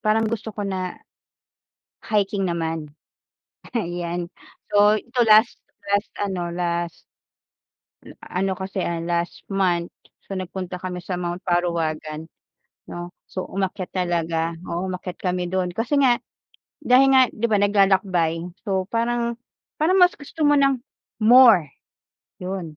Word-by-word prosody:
parang 215 +1 +2
gusto 220 -1 -4
ko 205 - -3
na 185 -2 -3 1.0
hiking 200 -3 0
naman. 165 -2 -2 0.9
Ayan, 175 -3 -3 0.5
so 205 +1 +6
ito 240 +3 -2
last 215 +2 +5 0.3
last 205 +1 +1
ano, 185 -4 -2
last 170 -1 -3 1.0
a 180 - -5
ano 190 -1 -1
kasi, 190 -1 -3
ah, 170 -1 -2
last 170 +1 -3
month, 180 -3 +1 0.4
so 195 - -5
nagpunta 185 0 -5
kami 180 0 -5
sa 180 +1 -4
Mount 175 0 -3
Parawagan, 160 -3 -1 0.6
'no. 175 0 -7 0.2
So, 185 - -4
umakyat 190 -1 -3
talaga, 170 -2 -1
oo 180 +1 -3
umakyat 180 -1 -6
kami 180 -1 -2
do'n 180 -2 -1
kasi 250 +6 +1
nga 255 -3 +5 0.6
dahil 265 +2 +5
nga 260 -1 +6
di 235 - -1
ba 205 - +4
naglalakbay, 190 -5 +2 0.2
so 190 -2 -1
parang, 235 +1 -1 0.4
parang 360 +5 +2
mas 360 0 +6
gusto 300 +1 -2
mo 290 - +5
ng 275 -2 +3 0.4
more 225 - +7 0.7
yun 180 -4 -6
185 Hz, 130 wpm, -23 LUFS, 175-215 Hz, 1.0 s, more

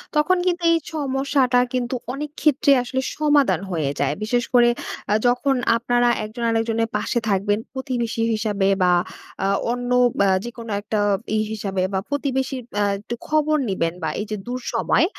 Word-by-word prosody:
তখন 300 +5 +3
কিন্তু 350 -1 0
এই 335 - +4 0.2
সমস্যাটা 270 -3 +1
কিন্তু 250 0 -1 0.2
অনেক 295 +2 -4
ক্ষেত্রে 280 -1 +3
আসলে, 260 +2 -2 0.2
সমাধান 285 - +3
হয়ে 155 -5 -1
যায়। 140 +1 +1
বিশেষ 240 +3 +1
করে, 240 -1 +6 0.4
আ - - +4
যখন 265 +3 +2 0.2
আপনারা 240 +1 +1 0.2
একজন 220 +3 -6
আরেকজনের 225 0 0
পাশে 240 - -1
থাকবেন, 205 +1 +1
প্রতিবেশী 245 -4 -2
হিসাবে, 210 -2 0 0.2
বা 180 - +4 0.8
অন্য 245 0 -3 0.5
যেকোনো 235 -1 -7
একটা 210 +1 -2 0.4
ইয়ে 215 - +1
হিসাবে 195 -3 -2
বা 190 - +1
প্রতিবেশীর 265 -2 -1 0.2
আ - - +3 0.2
একটু 230 +3 -6
খবর 310 0 +2
নিবেন 165 -3 0
বা 160 - 0
এই - - -4
যে 215 - -1
দুঃসময়, 250 +6 +1
245 Hz, 150 wpm, -22 LUFS, 215-270 Hz, 0.8 s, করে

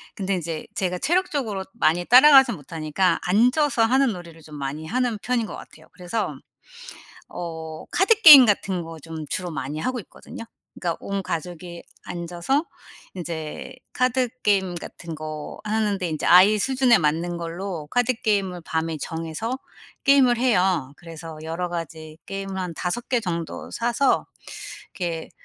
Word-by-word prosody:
근데 195 -1 -1
이제 165 -3 -5
제가 180 -2 -1
체력적으로 280 - -1
많이 175 -6 +1
따라가지는 265 0 +7
못하니까 160 +4 -1
앉아서 245 - +3
하는 260 +1 +3
놀이를 170 -3 -11
좀 155 -1 -12
많이 145 +2 -5
하는 245 +3 0
편인 245 -3 0
것 - - -7
같아요. - - -14
그래서 180 -2 -3 0.9
어 160 -2 -7
카드 415 +4 +3
게임 285 - +11
같은 195 -4 0
거 165 0 -9
좀 160 0 -7
주로 180 -1 -2
많이 140 +1 -4
하고 255 +8 -2
있거든요. 220 - -11 0.3
그니까 170 -2 -3
온 200 -1 -3
가족이 175 +1 -6 0.2
앉아서 175 - -2 0.5
인제 160 -3 -6 0.2
카드 255 0 +1
게임 190 -3 +2
같은 170 -1 -8
거 155 -1 -7
하는데 210 -3 0
인제 155 -1 -3
아이 195 +4 +7
수준에 260 +1 +3
맞는 165 +3 0
걸로 170 -1 -5
카드 245 +1 +2
게임을 200 -6 -1
밤에 160 0 -2
정해서 165 +10 -4 0.5
게임을 270 -3 +5
해요. 185 - +1
그래서 165 -2 -10
여러 165 +3 -3
가지 160 -2 -7
게임을 195 -1 -5
한 180 -2 -3
5 180 +9 -3
개 250 -2 +2
정도 170 -5 -4
사서 240 +4 +1 0.7
이렇게 170 -3 -4
180 Hz, 305 characters per minute, -23 LUFS, 165-235 Hz, 0.9 s, 게임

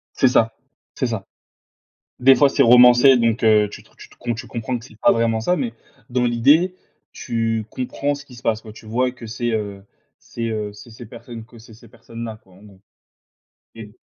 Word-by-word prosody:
C'est 130 - +3
ça 115 -2 +3 0.4
c'est - - -2
ça. - - -4 0.9
Des 135 +1 +6
fois 140 +3 +4
c'est 140 - +1
romancé 125 +2 +7
donc 115 -1 0
heu, 105 -2 +4
tu - - -10
te - - -26
re - - -29
tu - - -14
te 120 - -6
tu 115 - -8
comprends 120 +2 -4
que 115 - -12
c'est 110 -3 -18
pas - - +4
vraiment 115 -1 +1
ça, 175 +11 0
mais 125 -8 -3 0.4
dans 125 0 0
l'idée, 145 +10 +3 0.4
tu 115 -1 -2
comprends 140 +4 -3
ce 145 0 -12
qui 125 -3 -15
se 120 - -13
passe 110 -2 0
quoi. 110 -1 -12
Tu 110 - -15
vois? 125 +3 0
Que 125 -2 -11
c'est, 120 +1 -3
heu 100 -3 -4 0.4
c'est, 115 -1 -5
heu, 105 -2 -4
c'est 105 +3 -14
ces 115 +2 -11
personnes 115 0 -11
que 115 +1 -17
c'est 115 0 -15
ces 115 +2 -17
personnes-là 115 0 -9
quoi, 95 - -23
en 95 +3 -19
gros, 100 -3 -18 0.9
et - - -10
115 Hz, 215 wpm, -20 LUFS, 110-125 Hz, 0.9 s, romancé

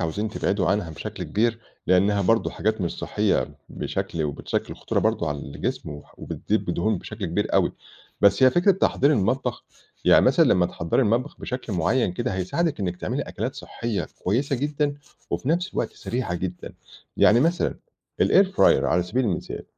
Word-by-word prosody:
عاوزين 95 +6 -2
تبعدوا 100 -2 -1
عنها 100 -4 0
بشكل 80 - -6
كبير، 115 +2 0 0.3
لإنها 100 +3 +3
برضه 115 +5 +2
حاجات 110 -1 -1
مش 85 - -2
صحيّة 75 - 0
بشكل 80 - -3
وبتشكِّل 75 -2 -3
خطورة - - -2
برضه - - 0
على 75 0 -3
الجسم، 75 +1 -5 0.2
وبتضيف - - -2
دهون 105 +2 0
بشكل - - -7
كبير - - -1
أوي. - - +3 0.5
بس 100 +6 +4
هي 130 - +8
فكرة 175 +6 +4
تحضير 155 -5 +2
المطبخ 125 +3 0 0.4
يعني - - +6
مثلًا - - +5
لمّا 90 -1 +3
تحضّري 85 +9 0
المطبخ 120 +5 0
بشكل 125 -3 -5
معيّن 90 +4 +1
كده، 95 - -2
هيساعدِك 140 - -1
إنِّك 90 -2 -2
تعملي - - -2
أكلات - - -4
صحيّة 115 -3 -4 0.2
كويسة 130 +8 +1
جدًا، 145 +1 -1 0.4
وفي 130 - -2
نفس 175 +3 0
الوقت - - -1
سريعة 120 -7 -3
جدًا. 90 +1 -5 0.4
يعني 115 +3 +5
مثلًا 170 +5 +1 0.5
الAir 195 - +5
fryer 190 0 -6 0.2
على 85 +5 +2
سبيل 120 +9 -1
المثال، 95 -6 -3
105 Hz, 160 wpm, -24 LUFS, 90-130 Hz, 0.5 s, هي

